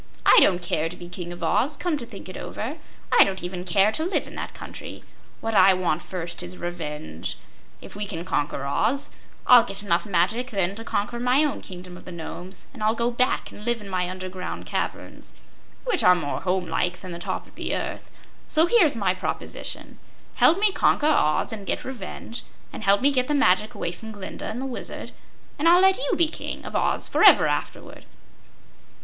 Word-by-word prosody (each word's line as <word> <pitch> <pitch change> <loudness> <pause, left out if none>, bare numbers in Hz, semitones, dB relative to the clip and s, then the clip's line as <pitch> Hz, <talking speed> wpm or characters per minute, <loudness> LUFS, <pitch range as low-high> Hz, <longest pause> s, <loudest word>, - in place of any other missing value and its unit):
"I - - +8
don't 180 -2 +3
care 165 -1 0
to 180 - -8
be 175 - -10
King 175 -1 -6
of 175 0 -7
Oz, 275 - +1
come 350 -3 0
to 235 - -7
think 200 -5 -10
it 185 - -9
over. 270 +9 -5 0.3
I - - +8
don't 190 -2 -3
even 180 0 -4
care 195 +4 +3
to 315 - 0
live 360 +3 0
in - - -11
that - - -6
country. - - -9 0.4
What 225 - -2
I 195 -2 +6
want 175 -3 0
first 175 -2 -4
is 180 +1 -6
revenge. 150 - -5 0.4
If - - -11
we 205 0 -2
can 170 -3 -5
conquer 145 -5 -1
Oz, 275 - 0 0.3
I'll 245 -2 +8
get 200 +1 -1
enough 175 0 +1
magic 205 +7 +1
then 195 -4 +1
to 225 +3 -7
conquer 230 +1 -2
my 250 +4 +3
own 295 - -1
Kingdom 180 -1 -9
of - - -14
the - - -8
Nomes, 175 +2 -8
and 245 - -11
I'll 215 +1 +2
go 235 +1 0
back 250 +2 0
and 210 - -11
live 240 +1 0
in 205 -2 -10
my 180 -1 -1
underground 185 0 -6
caverns, - - -5 0.5
which 470 -7 +1
are 180 0 +7
more 150 -5 -3
home 185 0 0
like 175 +2 -1
than 185 - -8
the 170 - -6
top - - -4
of - - -20
the - - -3
earth. - - -5 0.4
So 315 +1 +3
here's 345 - +4
my 195 -5 +1
proposition: 185 - -5 0.3
Help 340 - +5
me 420 0 +4
conquer 305 - +2
Oz 190 - +2
and 205 -3 -7
get - - -2
revenge, 235 -1 -6 0.3
and - - -7
help 200 0 +4
me 280 +2 +4
get 255 -2 +1
the 295 - +1
magic 210 -4 +3
away 170 - -3
from 220 +5 -9
Glinda 200 -2 -7
and 230 - -4
the 265 - -3
Wizard, 260 -2 -6 0.5
and 325 +3 +4
I'll 350 +1 +7
let 380 +2 +5
you - - +1
be 335 - +5
King 310 - -6
of - - -7
Oz - - +1
forever - - +7
afterward." - - -4
195 Hz, 205 wpm, -24 LUFS, 180-250 Hz, 0.5 s, I